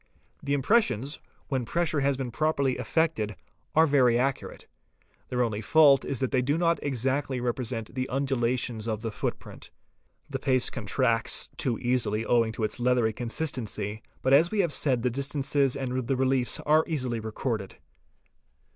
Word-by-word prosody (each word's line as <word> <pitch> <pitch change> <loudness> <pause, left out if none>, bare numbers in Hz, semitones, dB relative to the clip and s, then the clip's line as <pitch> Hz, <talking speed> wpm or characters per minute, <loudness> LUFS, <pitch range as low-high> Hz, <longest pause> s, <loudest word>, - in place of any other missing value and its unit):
The 140 0 0
impressions, 145 - +1 0.3
when 130 -3 -1
pressure 165 +4 0
has 140 -1 +1
been 130 -3 -4
properly 140 -1 0
effected, 155 - 0 0.4
are 160 +1 +6
very 130 -5 +4
accurate. 135 +2 -2 0.6
Their 125 0 +1
only 110 -3 -2
fault 145 0 +5
is 135 - -3
that 130 - 0
they 130 - +2
do 140 +5 0
not 170 0 +2
exactly 135 0 -1
represent 120 -2 -3
the 130 0 -3
undulations 125 -4 -1
of 110 -1 -3
the 115 - -2
foot - - -3
print. - - -13 0.6
The - - -4
paste 130 -2 +1
contracts - - 0
too 120 -4 -1
easily 115 -3 0
owing 115 -2 +2
to 110 - -4
its 110 - -2
leathery 120 -2 +2
consistency, 115 -4 -3 0.2
but 130 - +3
as 160 +5 +6
we 210 0 +1
have 170 -5 0
said 130 -5 +1
the 125 - +1
distances 140 0 0
and 130 -2 -3
the 135 - +1
reliefs 130 -2 +1
are 155 +1 +4
easily 130 -8 -1
recorded. 110 -2 -4
130 Hz, 160 wpm, -27 LUFS, 120-140 Hz, 0.6 s, are